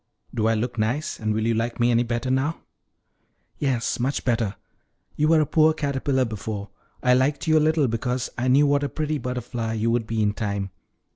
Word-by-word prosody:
Do 110 -1 +1
I 115 - +3
look 120 +1 -2
nice; 120 +8 -1
and 110 -1 -1
will 110 +1 0
you 115 - +2
like 115 +2 -2
me 120 +1 +3
any 120 0 +3
better 120 +1 -2
now?" 135 +5 0 1.0
"Yes, 130 -5 0
much 130 +4 -1
better. 115 -5 0 0.6
You 150 - +2
were 160 0 +5
a - - +2
poor 155 +2 +3
caterpillar 140 -3 0
before; 105 -2 -5 0.3
I 125 - +5
liked 130 +5 +1
you 160 -1 +3
a - - +6
little 155 -2 +3
because 125 +2 -1
I 125 0 -1
knew 135 +3 +5
what 145 0 +2
a 140 - -1
pretty 155 +1 -2
butterfly 120 -3 -3
you 115 +1 0
would 115 -2 0
be 115 -1 0
in 105 0 +1
time. 100 -3 -3
125 Hz, 205 wpm, -24 LUFS, 115-140 Hz, 1.0 s, a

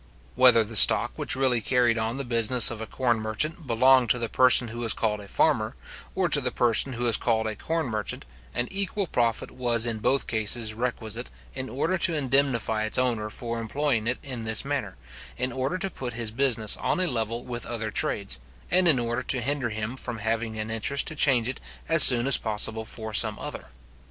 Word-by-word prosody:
Whether 125 -3 +5
the 110 +1 -8
stock - - +7
which - - 0
really 130 -3 0
carried 120 +1 +1
on 110 +3 -3
the 140 - -5
business 120 0 +3
of 115 -2 -8
a 110 - -7
corn 120 -4 -1
merchant 140 +9 -2
belonged 130 +1 +3
to - - +2
the 115 -2 -4
person 125 -1 +4
who 120 +1 -7
was 115 -2 +1
called 105 -2 -2
a 100 - -12
farmer, - - 0 0.4
or - - 0
to - - +3
the - - -2
person 120 +2 0
who 120 0 -5
was 115 -2 +2
called 110 -2 -1
a 110 -1 -4
corn 165 +7 -3
merchant, 110 -4 -5 0.3
an 120 - -2
equal 200 +1 -1
profit 120 -8 -2
was 120 -2 0
in 115 -2 -3
both 135 +5 0
cases 110 0 -1
requisite, 115 0 -5 0.2
in 130 0 -7
order 165 +8 -2
to 170 -1 +1
indemnify 130 -6 0
its 110 - 0
owner 120 -4 -1
for 115 +1 -6
employing 120 -1 -2
it 120 - -1
in 125 -5 -7
this 110 -1 +1
manner, - - -4 0.4
in 125 +1 -2
order 130 +7 -3
to 190 +1 -4
put 125 -6 -6
his 115 -2 -2
business 115 -3 0
on - - -2
a 185 - +1
level 115 -5 -4
with 120 -1 -5
other 115 -2 -5
trades, 100 -1 -2 0.3
and 185 -1 +3
in 155 -6 +5
order 120 0 -3
to 130 - 0
hinder 135 0 -2
him 110 +3 -5
from 120 -3 -5
having 110 0 -3
an 110 +1 -5
interest 115 +5 -1
to - - -5
change 130 -6 +2
it 130 - -5 0.3
as 165 0 +6
soon 120 -2 +11
as 135 - +3
possible 110 +1 -3
for 110 -1 -8
some - - +2
other. - - -8
120 Hz, 210 wpm, -25 LUFS, 110-130 Hz, 0.4 s, soon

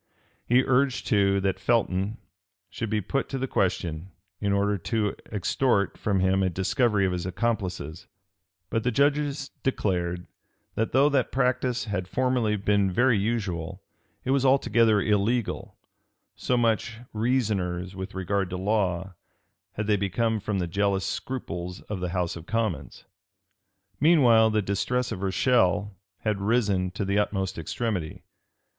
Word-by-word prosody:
He 125 +2 +4
urged 130 0 +1
too, 100 -1 +3
that 95 0 0
Felton 105 -3 0 0.5
should 115 - -4
be 105 0 0
put 135 +8 -2
to 135 - -3
the 130 - -1
question, 90 -6 -1 0.3
in 100 -1 0
order 100 +1 +2
to 105 0 -1 0.2
extort 105 0 +1
from 100 -3 0
him 95 +1 +2
a 95 - +2
discovery 100 - +1
of 95 - +1
his 90 0 -3
accomplices; 90 -5 -3 0.6
but 115 - +1
the 125 - +2
judges 140 +2 +1
declared, 90 -8 -1 0.5
that 110 - -1
though 135 +3 +5
that 135 -3 +1
practice 125 -1 0
had 100 -4 -3
formerly 125 -1 +1
been 100 0 +2
very 120 +6 +3
usual, 100 -7 -2 0.4
it 130 - 0
was 135 -1 +2
altogether 115 -5 +4
illegal: 105 +3 0 0.6
so 125 - 0
much 115 -1 +1 0.2
reasoners, 100 -6 -1
with 95 +1 -6
regard 95 0 -1
to 90 - -4
law, 95 -2 0 0.6
had 105 - -3
they 105 0 +2
become 110 +3 0
from 105 0 -2
the 90 - 0
jealous 95 +2 0
scruples 90 -9 -4
of 105 -3 -5
the 90 0 -2
house 90 -1 -1
of 85 0 -10
commons. 110 -11 -2 0.9
Meanwhile 125 -8 +5
the 110 -1 +1
distress 125 +6 -1
of 95 - -4
Rochelle 100 0 +2 0.3
had 105 -3 -1
risen 100 -4 +1
to 100 +2 -4
the 100 +1 +1
utmost 95 -4 -1
extremity. 90 -1 -3
105 Hz, 145 wpm, -26 LUFS, 95-120 Hz, 0.9 s, though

